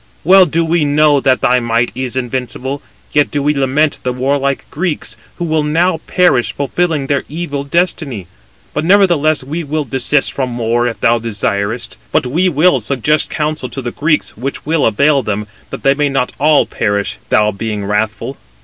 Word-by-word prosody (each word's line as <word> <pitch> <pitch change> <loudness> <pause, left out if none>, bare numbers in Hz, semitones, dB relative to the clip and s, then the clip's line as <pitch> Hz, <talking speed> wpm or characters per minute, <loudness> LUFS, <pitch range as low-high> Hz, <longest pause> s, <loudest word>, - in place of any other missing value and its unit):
Well 185 +2 +6
do 165 +2 0
we 165 0 +1
know 145 0 +3
that 130 -1 +2
thy 125 +1 +3
might 120 0 0
is 130 -1 -4
invincible: 130 +2 -3 0.3
yet 145 -1 +2
do 145 -1 -2
we 150 +1 +2
lament 140 +2 +1
the 125 - -1
warlike 135 +2 -1
Greeks, 155 -9 -3 0.2
who 175 - -3
will 160 -1 +1
now 165 +4 +1
perish, 175 -10 +2
fulfilling 150 +1 -1
their 140 0 0
evil 145 -3 -4
destiny. 140 - -1 0.5
But - - -1
nevertheless, 165 -6 +3
we 155 +6 -4
will 155 +1 -2
desist 135 +2 0
from 125 -3 -3
war, 120 +1 +1
if 115 - -4
thou 115 +1 +3
desirest 110 +1 -2
it. - - -19
But - - +2
we 170 +9 +1
will 155 -2 +3
suggest 140 +6 0
counsel 155 0 -2
to 135 - -6
the 120 - -3
Greeks, 150 +3 0
which 135 +5 -5
will 155 0 +2
avail 140 +6 +3
them, 105 -2 -3 0.2
that - - -7
they 135 - +4
may 145 0 0
not 135 -2 0
all 150 +1 +4
perish, 100 -1 -2
thou 105 0 +3
being 105 0 -4
wrathful." 105 +6 -2
140 Hz, 180 wpm, -15 LUFS, 120-155 Hz, 0.5 s, Well